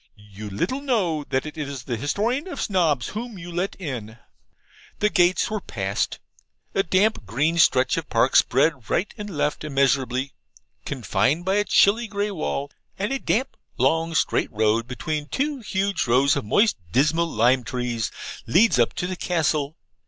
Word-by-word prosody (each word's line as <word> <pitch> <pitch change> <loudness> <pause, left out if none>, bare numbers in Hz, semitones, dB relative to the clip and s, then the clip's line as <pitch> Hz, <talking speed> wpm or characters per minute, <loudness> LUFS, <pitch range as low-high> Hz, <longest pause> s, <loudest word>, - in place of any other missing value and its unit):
'You 105 0 -10
little 180 - -2
know 195 - 0
that 130 +1 -1
it 155 +1 -7
is 140 -4 -5
the 125 -2 -3
Historian 215 - -1
of 360 - -6
Snobs 160 - +1
whom 225 0 -6
you 180 -1 -8
let 180 +3 -2
in!' 120 - -6 0.8
The 210 0 +1
gates 180 +3 +3
were 215 -2 -2
passed. 100 - -2 0.6
A 195 - +3
damp 190 - +1
green 150 - 0
stretch 130 -4 +4
of - - -4
park - - +2
spread 135 -3 +3
right 190 - 0
and 210 -2 -7
left 150 -4 -1
immeasurably, 135 -2 0 0.5
confined 135 - 0
by 190 +2 +2
a 205 - +3
chilly 225 +4 +4
grey 205 0 -2
wall, 145 -5 -3 0.3
and 205 +7 -1
a 270 - -1
damp 260 +3 -1 0.2
long 165 +6 +1
straight - - +1
road 110 +2 +1
between 150 +4 -3
two 285 - -2
huge 200 - -1
rows 130 +3 +4
of - - -3
moist, 210 - +3
dismal 155 - +2
lime 125 +1 +3
trees, 120 -3 -2 0.4
leads 175 - +4
up 120 - +3
to - - -3
the 185 +1 -3
Castle. 160 -3 -1
155 Hz, 165 wpm, -24 LUFS, 125-195 Hz, 0.8 s, stretch